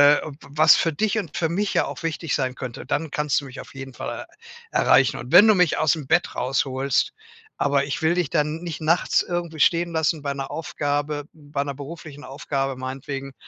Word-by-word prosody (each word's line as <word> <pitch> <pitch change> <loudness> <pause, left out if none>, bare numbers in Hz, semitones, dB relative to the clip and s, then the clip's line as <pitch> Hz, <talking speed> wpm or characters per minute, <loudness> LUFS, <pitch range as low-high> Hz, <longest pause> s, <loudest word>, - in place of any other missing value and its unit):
w 155 - -4 0.2
was 150 +2 +6
für 165 - +1
dich 215 +7 0
und 175 -8 -7
für 160 - +1
mich 195 +5 -1
ja - - +3
auch - - -7
wichtig 165 -1 -3
sein 130 -2 0
könnte. 125 0 -7
Dann 150 +1 -1
kannst 150 -4 +1
du - - -10
mich 130 - -10
auf - - -15
jeden 135 -1 -8
Fall - - -6 0.5
er - - +2
erreichen. 130 0 +4
Und 120 +1 -8
wenn 185 +5 +9
du 215 - +7
mich 180 -5 +3
aus'm 155 -2 +1
Bett - - +2
rausholst. 130 +1 0 0.5
Aber 140 -1 +3
ich 140 +3 -3
will 160 +1 +3
dich 175 -5 0
dann 155 0 0
nicht 170 -4 -5
nachts 165 +2 +2
irgendwie 170 -3 -4
stehen 170 +3 +3
lassen 160 -1 0
bei 140 -1 -2
'ner 135 -1 -5
Aufgabe 145 -1 -2
bei 145 -2 -5
'ner 140 0 -3
beruflichen 145 +1 -9
Aufgabe 135 -1 -3
meinetwegen“ 135 +1 -5
145 Hz, 205 wpm, -23 LUFS, 135-165 Hz, 0.5 s, wenn